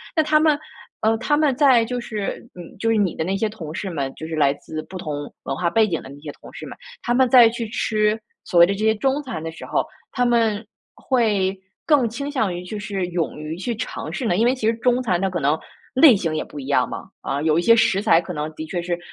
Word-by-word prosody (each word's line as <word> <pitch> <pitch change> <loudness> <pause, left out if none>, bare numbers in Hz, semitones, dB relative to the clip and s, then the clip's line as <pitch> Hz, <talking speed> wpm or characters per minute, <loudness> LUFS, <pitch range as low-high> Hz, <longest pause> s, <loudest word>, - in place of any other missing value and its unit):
那 315 - +4
他 305 0 +3
们 305 -1 +3 0.4
呃， 220 +1 +3
他 295 +4 +1
们 295 -4 +2
在 260 -5 +5
就 245 +2 -3
是 215 -3 -4
你 175 -2 -11
就 225 +3 0
是 225 - +3
你 195 -5 +1
的 - - -2
那 190 +4 -1
些 220 - 0
同 170 -8 -8
事 190 +3 -4
们， 140 -6 -3
就 160 - -7
是 160 - -4
来 145 -3 +3
自 155 +2 -7
不 185 - -9
同 145 -4 -5
文 - - -3
化 170 +4 0
背 220 +5 +3
景 165 -5 -2
的 - - -11
那 140 +1 -11
些 150 0 -9
同 - - -12
事 - - -8
们， - - -9 0.2
他 240 - 0
们 255 0 +3
在 245 -2 +8
去 230 0 -4
吃 215 0 0 0.2
所 175 - +1
谓 170 - +10
的 195 - -1
这 - - -9
些 220 0 +4
中 270 +6 0
餐 255 - -5
的 165 - -4
时 165 - -10
候， - - 0 0.3
他 245 - 0
们 230 -3 +1 0.3
会 205 -7 +1 0.3
更 285 -7 +3
倾 280 +6 -5
向 220 -10 0
于 175 +1 -6
就 210 +4 -6
是 205 -3 -3
勇 170 -2 -2
于 155 +1 -5
去 235 +6 -3
尝 245 - -5
试 260 - -4
呢 195 - +2
因 225 - +3
为 245 - +4
其 250 -5 -2
实 225 - +3
中 245 +2 +1
餐 185 -8 0
它 195 - +1
可 180 -2 -3
能 145 +3 +2 0.4
类 265 -1 +7
型 165 -4 -2
也 155 - -1
不 150 - -10
一 135 - -7
样 130 -3 +2
嘛。 - - -6 0.2
啊， 140 - -2
有 155 0 +3
一 - - +3
些 230 +6 +6
食 195 -4 +3
材 210 -6 +5
可 180 +1 -6
能 150 0 -4
的 155 - -6
确 175 +2 -3
是 175 0 -3
205 Hz, 290 characters per minute, -22 LUFS, 165-240 Hz, 0.4 s, 谓